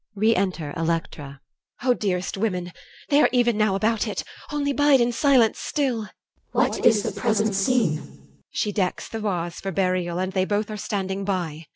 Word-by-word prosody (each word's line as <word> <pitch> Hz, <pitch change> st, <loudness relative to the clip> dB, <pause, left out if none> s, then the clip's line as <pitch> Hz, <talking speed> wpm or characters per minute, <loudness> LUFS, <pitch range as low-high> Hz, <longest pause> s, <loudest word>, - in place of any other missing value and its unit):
Re 220 Hz, +3 st, +3 dB
enter 180 Hz, -6 st, -1 dB
ELECTRA. 160 Hz, -4 st, -3 dB, 0.4 s
EL. 255 Hz, -, +3 dB
O -, -, +6 dB
dearest 185 Hz, -5 st, -2 dB
women! 185 Hz, -4 st, -2 dB, 0.4 s
they 285 Hz, +1 st, +5 dB
are -, -, +5 dB
even 240 Hz, -2 st, +3 dB
now 210 Hz, -2 st, +2 dB
About 220 Hz, +2 st, +1 dB
it. -, -, -3 dB, 0.3 s
Only 285 Hz, -1 st, 0 dB
bide 290 Hz, 0 st, +4 dB
in 240 Hz, 0 st, +2 dB
silence 250 Hz, -3 st, +3 dB
still. 255 Hz, -7 st, -1 dB
CH. -, -, -14 dB, 0.4 s
What -, -, +1 dB
is 215 Hz, -3 st, +5 dB
the -, -, -2 dB
present 215 Hz, -3 st, 0 dB
scene? 195 Hz, -5 st, +2 dB
EL. -, -, -12 dB, 0.4 s
She 210 Hz, -, -1 dB
decks 190 Hz, -3 st, -1 dB
the 225 Hz, -, -5 dB
vase 175 Hz, -5 st, -3 dB
For 195 Hz, -, -3 dB
burial, 180 Hz, -2 st, 0 dB
and 185 Hz, +1 st, -2 dB
they 185 Hz, -1 st, +1 dB
both 210 Hz, +2 st, -1 dB
are -, -, -4 dB
standing 195 Hz, -2 st, -3 dB
by. 170 Hz, -6 st, -3 dB
200 Hz, 190 wpm, -24 LUFS, 180-230 Hz, 0.4 s, O